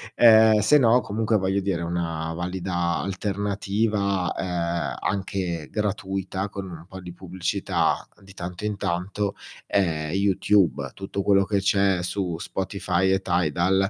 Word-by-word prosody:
ehm, 110 -2 +7
se 110 +9 +5
no 120 -1 +5
comunque 110 -1 0
voglio 95 0 0
dire 95 -3 -1
una 85 -1 -2
valida 90 0 -2
alternativa, 100 0 -1
ehm, 85 -2 -2
anche 90 -4 -2
gratuita 95 -2 -2
con 100 0 -6
un 85 -2 -10
po' 95 +1 -10
di 90 -1 -9
pubblicità 90 -1 -1 0.2
di 95 -1 -15
tanto 90 +2 -6
in 105 -1 -1
tanto 100 +2 -2 0.3
è 80 -6 0
YouTube. 100 -1 +2
Tutto 95 0 -4
quello 100 -1 +4
che 100 0 +1
c'è 100 -1 +2
su 90 -2 -2
Spotify 95 0 -1
e 95 0 +2
Tidal, 90 +2 +1
95 Hz, 135 wpm, -24 LUFS, 90-100 Hz, 0.3 s, ehm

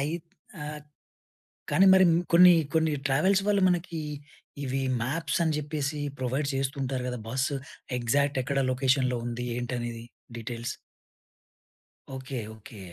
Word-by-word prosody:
అయిత్ 160 +4 -3 0.3
ఆహ్, 150 0 -6 0.9
కానీ, 190 - +5
మరి 190 0 +7 0.3
కొన్ని, 180 +1 +9 0.2
కొన్ని 160 -1 +2
ట్రావెల్స్ 185 +9 +3
వాళ్ళు 205 -1 +3
మనకి 175 -2 -1 0.6
ఇవి, 135 0 -1 0.2
మాప్స్ 165 +8 -1
అని 155 - +1
చెప్పేసి, 150 0 -3 0.2
ప్రొవైడ్ 135 +3 -1
చేస్తుంటారు 135 -1 -2
గదా! 125 - -4
బస్సు 135 +3 0 0.4
ఎగ్జాక్ట్ 140 +3 +1
ఎక్కడ 135 +1 -1
లొకేషన్‌లో 130 -1 +2
ఉంది, 120 +1 -4
ఏంటి 125 +1 -3
అనేది 120 -1 -5 0.3
డీటెయిల్స్. 115 +1 -5 1.4
ఓకే. 130 0 -5 0.2
ఓకే. 110 0 -13
135 Hz, 120 wpm, -28 LUFS, 125-155 Hz, 1.4 s, కొన్ని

